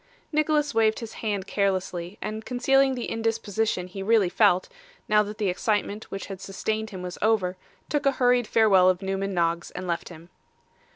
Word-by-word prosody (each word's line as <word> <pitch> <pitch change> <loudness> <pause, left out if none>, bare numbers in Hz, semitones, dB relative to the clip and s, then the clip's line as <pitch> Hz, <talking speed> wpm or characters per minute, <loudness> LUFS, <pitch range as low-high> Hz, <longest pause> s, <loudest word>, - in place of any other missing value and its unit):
Nicholas 300 -2 +1
waved 220 -1 +3
his 230 -2 -7
hand 205 -4 -2
carelessly, 190 -2 -2
and 215 +1 -4
concealing 265 +2 +2
the 245 - -4
indisposition 225 -4 -1
he 185 +2 -8
really 205 -2 +3
felt, 185 -2 +3 0.4
now 210 0 +5
that 210 0 -5
the 210 - 0
excitement 205 +3 -1
which 195 - -5
had 195 -2 -8
sustained 215 +3 -3
him 185 -4 -7
was 180 0 -6
over, 205 -4 +2 0.3
took 295 -1 0
a 275 - +4
hurried 245 -2 +2
farewell 195 -5 +5
of 185 +1 0
Newman 195 0 -2
Noggs, 170 0 0
and 180 - -7
left 170 -1 -3
him. 170 0 -13
210 Hz, 175 wpm, -26 LUFS, 185-225 Hz, 0.4 s, now